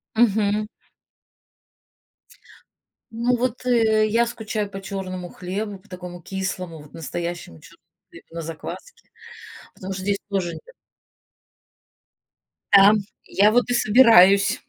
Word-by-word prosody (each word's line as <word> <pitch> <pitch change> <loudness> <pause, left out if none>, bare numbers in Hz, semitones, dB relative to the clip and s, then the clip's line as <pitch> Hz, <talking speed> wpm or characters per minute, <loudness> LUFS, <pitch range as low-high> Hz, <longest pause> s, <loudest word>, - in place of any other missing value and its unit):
Мгм. 215 -2 +2 2.4
Ну 235 +2 0
вот, 250 0 -3
э, 220 -3 +3
я 230 +2 +2
скучаю 215 -3 -4
по 195 -1 -8
чёрному 185 -2 -6
хлебу, 200 +4 -5
по 195 - -25
такому 180 -1 -9
кислому, 185 -3 -5
вот 150 - -17
настоящему 170 - -6
чёрному - - -18 0.3
хлебу - - -15
на 170 - -6
закваске, 165 - -9 0.7
потому 190 +1 -7
что 185 - -5
здесь 200 +1 -1
тоже 190 -4 -2
нет. - - -13 2.0
Да. 200 +1 +8 0.3
Я 205 +2 +3
вот 245 +2 +3
и - - +1
собираюсь, 205 -5 +5
200 Hz, 115 wpm, -22 LUFS, 180-225 Hz, 2.4 s, Да